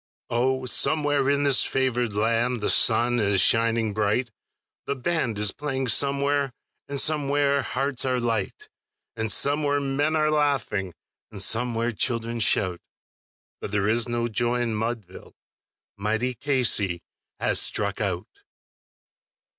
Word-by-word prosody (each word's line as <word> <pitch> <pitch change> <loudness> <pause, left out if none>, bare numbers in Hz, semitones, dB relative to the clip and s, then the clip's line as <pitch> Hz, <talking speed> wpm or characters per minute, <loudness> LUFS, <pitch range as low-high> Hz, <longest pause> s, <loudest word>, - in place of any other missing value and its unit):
Oh, 130 +2 0
somewhere 145 +1 +2
in 140 0 +1
this 140 -2 +4
favoured 125 -4 -1
land 115 +3 +1
the 105 - +1
sun 120 +1 +4
is 100 -2 +1
shining 115 0 +3
bright, 110 +4 -1 0.6
The 140 - -1
band 130 -5 -2
is 105 -2 +1
playing 135 -3 -3
somewhere, 140 0 +1 0.4
and 140 -1 -3
somewhere 145 -2 +1
hearts 135 0 -2
are 130 -1 0
light, 115 -2 -3 0.5
And 110 -1 -2
somewhere 145 +2 +2
men 140 +3 -1
are 155 -1 +1
laughing, 135 - -1 0.4
and 105 - -9
somewhere 115 +3 0
children 115 +1 -2
shout; 95 -5 +1 0.8
But - - -6
there 105 -1 -1
is 115 +2 +2
no 120 0 -1
joy 120 +2 -1
in 115 -2 -2
Mudville 110 -4 -6 0.6
mighty 110 +5 -1
Casey 115 - +1 0.4
has - - +2
struck - - 0
out. - - -4
120 Hz, 130 wpm, -24 LUFS, 110-140 Hz, 0.8 s, this